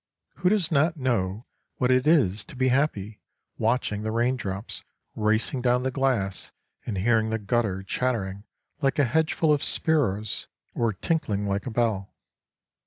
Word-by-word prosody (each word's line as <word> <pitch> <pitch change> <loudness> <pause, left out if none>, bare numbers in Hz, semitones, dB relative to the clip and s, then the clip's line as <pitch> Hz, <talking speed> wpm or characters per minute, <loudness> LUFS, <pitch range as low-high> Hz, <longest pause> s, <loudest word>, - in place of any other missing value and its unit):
Who 180 +3 +2
does 190 -5 +1
not 160 +2 +2
know 115 -5 -1 0.3
what 125 0 +2
it 130 +2 +3
is 115 - +3
to - - -12
be 130 0 +2
happy 115 -6 0 0.4
watching 110 -2 0
the 110 0 -2
rain 120 +3 +2
drops 100 -4 -5 0.3
racing 110 +4 +1
down 125 0 +2
the 130 - 0
glass 125 -8 0 0.4
and 105 - -2
hearing 110 +2 +2
the 110 - 0
gutter 105 -3 -1
chattering 100 -3 -2 0.4
like 135 -2 +1
a 145 - +4
hedgeful 155 +3 +2
of 145 - 0
sparrows 110 -10 0 0.3
or 115 -2 +1
tinkling 105 - -1
like 100 +4 -2
a - - -1
bell? 110 -4 -1
120 Hz, 155 wpm, -26 LUFS, 105-135 Hz, 0.4 s, a